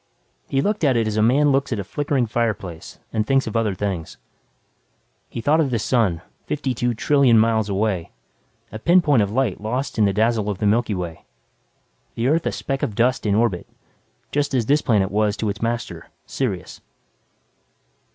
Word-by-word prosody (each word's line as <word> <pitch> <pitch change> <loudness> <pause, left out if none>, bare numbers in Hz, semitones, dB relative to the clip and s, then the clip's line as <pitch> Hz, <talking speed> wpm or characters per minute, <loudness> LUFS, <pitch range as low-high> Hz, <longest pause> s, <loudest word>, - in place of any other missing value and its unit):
He 135 0 0
looked 210 -3 -1
at 135 -5 +3
it 115 - +1
as 110 -1 -2
a 110 - +2
man 140 +6 +4
looks 135 0 0
at 115 - 0
a 100 - -3
flickering 140 +4 -1
fireplace 105 -8 -3 0.2
and 110 -1 +1
thinks 135 0 +2
of 110 - -6
other 110 -4 +1
things. 90 -4 -4 1.1
He 115 - -5
thought 150 +6 +3
of 150 -4 +2
the 120 - 0
sun, 105 -7 0 0.2
52 125 -4 -1
trillion 135 -1 +4
miles 110 -1 +2
away, 100 -3 -1 0.6
a 110 - -6
pinpoint 165 -5 +4
of 100 - 0
light 120 -5 0
lost 125 +3 -3
in 105 - +5
the 100 - +2
dazzle 110 +1 +1
of 100 - -2
the 105 - -2
Milky 110 0 +2
Way 85 -2 -6 0.9
the 120 +3 0
Earth 165 +3 +1
a - - 0
speck 135 -1 -3
of 105 - -2
dust 120 0 +1
in 100 - +2
orbit 105 -6 0 0.6
just 145 -1 0
as 120 -3 +1
this 145 +5 +3
planet 100 -5 +1
was 105 0 +1
to 110 - -1
its 105 +2 -5
master, 120 +1 -3 0.2
Sirius. 105 -10 -4
115 Hz, 180 wpm, -22 LUFS, 105-135 Hz, 1.1 s, in